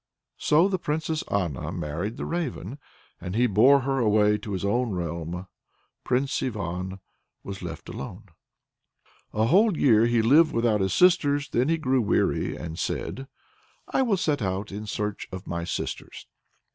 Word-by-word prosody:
So 160 +5 +4
the 190 -2 -1
Princess 155 0 -2
Anna 85 -10 -1
married 85 +10 -4
the - - -4
Raven, 145 - -4 0.4
and 90 +2 -5
he 120 +2 +3
bore 125 +6 +5
her 135 +1 -1
away 105 -2 +3
to 105 - -6
his 95 +1 -2
own 120 +4 +1
realm. 85 +1 -4 0.6
Prince 135 +3 0
Ivan 95 -4 -4 0.4
was 100 0 -7
left 85 -4 -7
alone. 70 - -8 1.0
A 110 +1 +1
whole 190 - +4
year 115 -3 +5
he 120 -1 +2
lived 150 +8 +5
without 115 -3 +2
his 95 -1 0
sisters; 145 -6 +3
then 125 +5 +1
he 165 - +2
grew 130 -4 +1
weary, 105 - +1
and 80 -1 -7
said: 135 +1 -3 0.6
"I - - +1
will 230 -7 +2
set 150 -6 0
out 95 +1 -2
in 105 +2 -6
search 105 -1 -3
of 95 0 -7
my 85 0 -3
sisters." - - -5
110 Hz, 160 wpm, -26 LUFS, 95-140 Hz, 1.0 s, bore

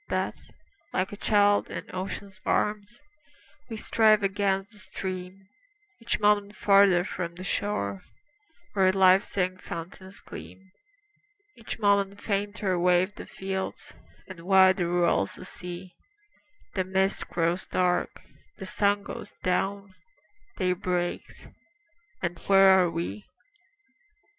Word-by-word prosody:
But, - - -1 0.6
like 185 +1 0
a - - -6
child 205 0 +3
in - - -5
ocean's 195 +2 -6
arms, 210 +2 -1 0.7
We 225 - -5
strive 215 -1 +3
against 195 0 0
the 210 - -10
stream, 190 -1 -6 0.5
Each 235 0 -2
moment 205 0 +2
farther 195 -4 +5
from 170 -3 -5
the 185 - -8
shore 100 - -2 0.7
Where 190 -2 +4
life's 190 +1 +4
young 185 0 0
fountains 185 +3 -8
gleam; 190 0 -11 0.8
Each 230 - -7
moment 200 -2 +2
fainter 200 -2 -1
wave 180 +2 +3
the - - -10
fields, 190 0 -5 0.3
And 185 -3 -10
wider 185 0 +4
rolls 175 - +1
the - - -11
sea; 180 0 -9 0.8
The 190 - 0
mist 190 +1 0
grows 170 +2 -1
dark, 180 -1 0 0.3
the 190 - -7
sun 205 0 +1
goes 205 - -8
down, 195 +2 -1 0.6
Day 185 -3 +1
breaks, 180 -1 -3 0.8
and 175 -1 -2
where 195 -1 +7
are 190 -2 +5
we? 165 - -5
190 Hz, 120 wpm, -27 LUFS, 180-200 Hz, 0.8 s, where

